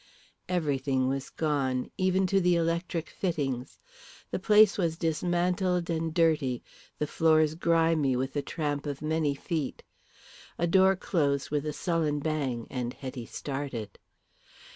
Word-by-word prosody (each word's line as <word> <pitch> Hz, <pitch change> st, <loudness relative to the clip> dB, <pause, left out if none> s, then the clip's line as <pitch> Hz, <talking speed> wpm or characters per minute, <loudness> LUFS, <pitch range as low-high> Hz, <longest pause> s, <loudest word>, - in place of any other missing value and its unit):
Everything 140 Hz, -6 st, 0 dB
was 135 Hz, 0 st, -2 dB
gone, 135 Hz, -5 st, -1 dB
even 185 Hz, 0 st, +2 dB
to 195 Hz, +1 st, +2 dB
the 180 Hz, 0 st, +3 dB
electric 170 Hz, 0 st, -1 dB
fittings. 140 Hz, -8 st, -2 dB, 0.5 s
The -, -, -1 dB
place 215 Hz, -1 st, +6 dB
was 165 Hz, -4 st, 0 dB
dismantled 175 Hz, +2 st, 0 dB
and 165 Hz, 0 st, -1 dB
dirty, 155 Hz, -7 st, +1 dB, 0.3 s
the 150 Hz, -, 0 dB
floors 155 Hz, 0 st, +3 dB
grimy 165 Hz, -4 st, +2 dB
with 130 Hz, +2 st, -2 dB
the 145 Hz, -, 0 dB
tramp 145 Hz, -1 st, -3 dB
of 145 Hz, +1 st, -5 dB
many 155 Hz, -2 st, 0 dB
feet. 150 Hz, 0 st, -3 dB, 0.7 s
A 170 Hz, -, +1 dB
door 190 Hz, +2 st, +5 dB
closed 145 Hz, -7 st, 0 dB
with 150 Hz, 0 st, -1 dB
a -, -, 0 dB
sullen 160 Hz, -3 st, 0 dB
bang, 140 Hz, -6 st, -2 dB
and 125 Hz, -2 st, -3 dB
Hetty 130 Hz, -3 st, -7 dB
started. 135 Hz, -6 st, -5 dB
155 Hz, 135 wpm, -29 LUFS, 140-170 Hz, 0.7 s, place